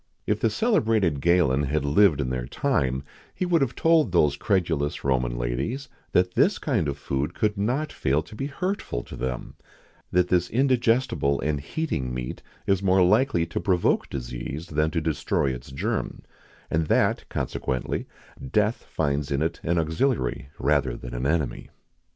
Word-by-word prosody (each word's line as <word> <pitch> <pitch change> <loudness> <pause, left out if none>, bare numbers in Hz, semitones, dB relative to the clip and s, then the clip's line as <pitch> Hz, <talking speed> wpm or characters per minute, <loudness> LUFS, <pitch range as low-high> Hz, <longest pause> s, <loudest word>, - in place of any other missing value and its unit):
[XIX - - -46
48] - - +5
If - - -14
the 115 - +3
celebrated 110 - +2
Galen 85 -5 +3
had 75 +1 -1
lived 75 +1 +4
in 65 -2 -2
their 60 -1 -3
time, 65 +1 0 0.3
he 185 - -1
would 170 -3 +2
have 130 -3 0
told 160 - +3
those 75 -5 +3
credulous 85 -6 0
Roman 60 -3 0
ladies, 65 - -2 0.2
that 90 0 +2
this - - +3
kind 80 - 0
of 70 0 -2
food 70 0 -2
could 105 -1 +1
not 125 +10 -1
fail 70 +4 +1
to 85 +7 -13
be 135 +6 -3
hurtful 170 - -3
to - - -10
them; 65 -1 -4 0.6
that 90 0 +2
this 90 -1 +2
indigestible 120 - +2
and 75 -1 0
heating 70 - -3
meat 60 -1 -5 0.2
is 95 -1 +2
more 95 -1 +4
likely 95 -3 +3
to 85 - -3
provoke 90 -3 +1
disease 65 +5 -5
than 75 +1 +1
to 80 +1 -1
destroy 75 -3 0
its - - -8
germ; 65 - -3 0.5
and 80 0 +1
that, - - +2
consequently, 65 -1 -2 0.4
death 105 +2 +1
finds 70 -2 0
in 70 +2 +1
it 80 - -2
an 85 +1 0
auxiliary 80 - 0
rather 70 -3 +1
than - - -8
an - - -1
enemy. 75 -5 -1
80 Hz, 170 wpm, -25 LUFS, 70-105 Hz, 0.6 s, 48